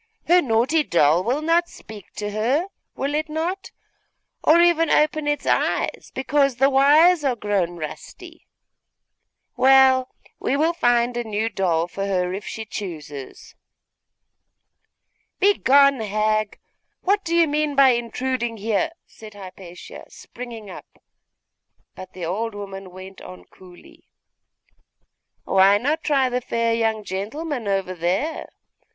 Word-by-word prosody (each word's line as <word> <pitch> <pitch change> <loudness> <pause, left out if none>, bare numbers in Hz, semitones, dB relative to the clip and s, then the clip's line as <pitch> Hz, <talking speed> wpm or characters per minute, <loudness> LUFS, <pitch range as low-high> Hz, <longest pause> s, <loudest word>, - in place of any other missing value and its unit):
her 355 +1 +5
naughty 255 +5 +1
doll 170 - +2
will 260 +8 -1
not 335 +2 +2
speak 210 -4 -13
to 205 0 -4
her, 245 - 0 0.3
will 280 +2 -3
it 310 +1 -2
not? 355 +5 -3 0.7
or 320 +2 +5
even 340 -2 +3
open 305 0 +1
its 295 0 -1
eyes, - - -1
because 275 0 +1
the 270 +3 +3
wires 300 +5 +5
are 265 -3 +1
grown 195 -5 -2
rusty? 155 -2 -10 1.1
Well, 265 -1 +5 0.3
we 275 - -1
will 320 +3 +1
find 240 -5 +1
a 240 - -2
new 220 0 -2
doll 175 -5 0
for 195 +2 -5
her, 180 -2 -1
if 200 +2 -6
she 220 - -6
chooses.' 155 -10 -8 1.9
'Begone, 280 -9 +4
hag! 215 0 -1 0.4
What 400 +2 +1
do 335 0 -2
you 335 -1 +4
mean 300 0 -1
by 275 -1 +6
intruding 240 0 -2
here?' 225 +10 -1
said 215 -2 -14
Hypatia, 185 -2 -11
springing 235 -3 -10
up; - - -13 0.9
but 185 0 -11
the 180 -2 -6
old 210 +6 -3
woman 195 -2 -8
went 185 +1 -12
on 90 -1 -12
coolly 180 - -18 1.4
'Why 195 +1 +4
not 295 +8 -2
try 275 -4 +2
the 250 0 -2
fair 230 -1 -1
young 225 -2 -1
gentleman 225 - -5
over 195 -2 -1
there? 185 - -2
235 Hz, 130 wpm, -22 LUFS, 195-290 Hz, 1.9 s, by